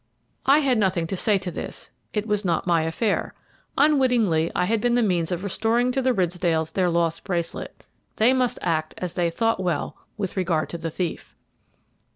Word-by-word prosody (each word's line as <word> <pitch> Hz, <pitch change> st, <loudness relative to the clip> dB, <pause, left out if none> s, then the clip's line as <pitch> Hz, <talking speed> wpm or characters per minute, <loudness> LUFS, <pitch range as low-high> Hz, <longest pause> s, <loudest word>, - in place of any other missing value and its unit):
I 285 Hz, +3 st, +6 dB
had 260 Hz, -5 st, +2 dB
nothing 185 Hz, -4 st, +1 dB
to 190 Hz, -, -3 dB
say 205 Hz, +2 st, +3 dB
to 185 Hz, -2 st, -5 dB
this, -, -, -7 dB, 0.2 s
it 210 Hz, -1 st, -2 dB
was 210 Hz, -1 st, 0 dB
not 170 Hz, -4 st, 0 dB
my 170 Hz, -2 st, +3 dB
affair. 195 Hz, +6 st, -1 dB, 0.4 s
Unwittingly 245 Hz, -, +3 dB
I 180 Hz, -, +2 dB
had 220 Hz, +2 st, 0 dB
been 240 Hz, 0 st, +2 dB
the 245 Hz, -, +3 dB
means 175 Hz, -4 st, 0 dB
of 175 Hz, +1 st, -2 dB
restoring 230 Hz, +5 st, +1 dB
to 265 Hz, +1 st, 0 dB
the 260 Hz, 0 st, +2 dB
Ridsdales 175 Hz, -5 st, 0 dB
their 185 Hz, -2 st, +2 dB
lost 170 Hz, -1 st, 0 dB
bracelet; 170 Hz, -3 st, -4 dB, 0.3 s
they 235 Hz, +4 st, +4 dB
must 255 Hz, -2 st, +1 dB
act 155 Hz, -2 st, -1 dB
as 180 Hz, -2 st, -4 dB
they 175 Hz, -1 st, +1 dB
thought 225 Hz, +6 st, 0 dB
well 175 Hz, -5 st, -2 dB, 0.2 s
with 195 Hz, -3 st, -3 dB
regard 175 Hz, -5 st, 0 dB
to 170 Hz, -, -5 dB
the 165 Hz, 0 st, -3 dB
thief. 170 Hz, +1 st, -5 dB
185 Hz, 190 wpm, -24 LUFS, 170-225 Hz, 0.4 s, I